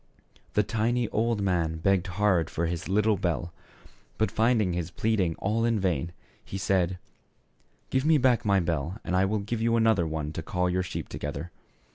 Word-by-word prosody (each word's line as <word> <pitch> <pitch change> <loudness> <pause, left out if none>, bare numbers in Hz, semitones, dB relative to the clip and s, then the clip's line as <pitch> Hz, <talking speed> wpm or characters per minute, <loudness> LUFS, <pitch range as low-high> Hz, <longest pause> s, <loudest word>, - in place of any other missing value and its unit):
The 105 - +3
tiny 115 +3 0
old 115 -1 0
man 85 -4 0
begged 95 +2 +1
hard 100 -6 +2
for 85 - -1
his 85 +1 -3
little 105 +1 +3
bell; 85 -1 -2 0.6
but 110 - +1
finding 110 -5 +2
his 85 -1 -2
pleading 95 -3 0
all 110 +3 -1
in 115 -2 +2
vain 85 -4 0 0.3
he 95 - -6
said, 95 -2 +1 0.9
"Give 130 0 +1
me 155 +1 +5
back 125 -3 +3
my 100 -2 +3
bell 85 +2 -2
and 90 - -2
I 95 +1 +4
will 105 +3 0
give 110 +3 -3
you 115 0 +2
another 110 -7 +3
one 80 -1 -3
to 80 - -4
call 90 +2 -1
your 90 +1 +1
sheep 90 - -5
together. 75 +4 -5
95 Hz, 180 wpm, -27 LUFS, 85-110 Hz, 0.9 s, me